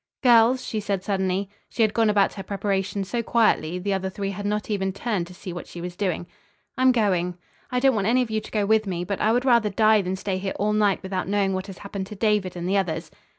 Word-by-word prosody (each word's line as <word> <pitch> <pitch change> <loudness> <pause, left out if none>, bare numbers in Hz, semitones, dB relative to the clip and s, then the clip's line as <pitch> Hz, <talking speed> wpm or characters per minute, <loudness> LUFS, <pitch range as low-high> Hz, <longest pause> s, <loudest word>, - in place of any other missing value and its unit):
"Girls," 245 +1 +5
she 220 - -2
said 200 -2 -2
suddenly. 190 -1 -1 0.2
She 230 - +1
had 215 -1 +2
gone 225 -2 +3
about 205 -2 +3
her 195 - -6
preparations 195 0 -2
so 235 +4 -1
quietly 215 -8 +2
the 195 +2 -1
other 190 0 -1
three 195 +1 -4
had 200 +1 -4
not 210 0 -1
even 190 -2 0
turned 200 -3 -2
to 180 - -12
see 180 0 -7
what 175 - -7
she 175 - -9
was 175 0 -6
doing. 180 -3 -2 0.5
"I'm 255 0 +4
going. 180 -7 +1 0.3
I 250 - 0
don't 265 +1 +4
want 205 -3 0
any 250 +2 +3
of 225 - -7
you 215 0 0
to - - -11
go 210 -2 0
with 215 0 +2
me, 175 -2 -2
but 195 +2 -3
I 215 - +3
would 245 +3 +1
rather 235 -4 +4
die 215 +1 +4
than 185 0 -2
stay 190 0 -3
here 190 0 -3
all 210 +1 +1
night 205 -2 +2
without 190 -1 -3
knowing 200 -1 +1
what 190 +1 -3
has 195 -2 -9
happened 200 -1 -6
to 210 - -8
David 205 -3 +1
and 175 0 -4
the 195 +2 +2
others." 165 -4 -2
200 Hz, 255 wpm, -24 LUFS, 190-215 Hz, 0.5 s, Girls